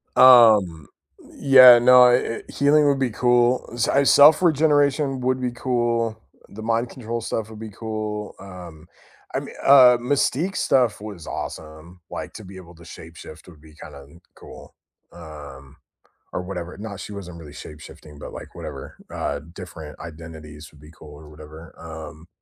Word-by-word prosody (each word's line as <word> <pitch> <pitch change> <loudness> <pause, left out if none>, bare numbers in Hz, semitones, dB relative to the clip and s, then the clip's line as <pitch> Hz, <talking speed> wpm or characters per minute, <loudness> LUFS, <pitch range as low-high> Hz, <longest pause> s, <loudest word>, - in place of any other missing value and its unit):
Um, 110 - +5 0.5
yeah, 130 -3 +7
no, 125 0 +6
e 120 -2 -2
healing 145 +2 +2
would 140 -1 +1
be 130 -2 -1
cool, 120 +2 +1
s 120 - -1
I 140 +1 +2
self 150 +4 +6
regeneration 145 -4 +1
would 130 +1 -1
be 125 -1 -2
cool, 120 -3 -2 0.3
the 110 - -11
mind 115 +2 -2
control 115 -2 -6
stuff 110 -1 -5
would 110 -1 -12
be 110 - -8
cool, 105 0 -6
um, 90 -4 -13 0.5
I - - -1
mean, - - -11
uh, 130 -3 +7
mystique 145 +7 -1
stuff 125 -5 +1
was 100 -7 -10
awesome, 80 +3 -9
like - - -8
to - - -11
be 95 0 -13
able 85 -2 -14
to 85 +1 -17
shape 80 0 -13
shift - - -13
would 80 -5 -17
be 80 -1 -18
kinda 70 -1 -12 0.3
cool, - - -15 0.4
um, 75 -4 -13 0.6
or - - -3
whatever 90 -1 -8
not 100 -1 -9
she 105 - -9
wasn't 90 -4 -10
really 75 -3 -13
shape 75 0 -12
shifting, 75 -2 -15
but - - -10
like - - -11
whatever, - - -10 0.2
uh, 70 - -4
different 85 -5 -11
identities 80 -2 -12
would 75 -1 -21
be 75 - -16
cool 75 -2 -15
or 75 +1 -15
whatever, 80 +2 -14
um. 80 0 -11
105 Hz, 165 wpm, -21 LUFS, 80-125 Hz, 0.6 s, yeah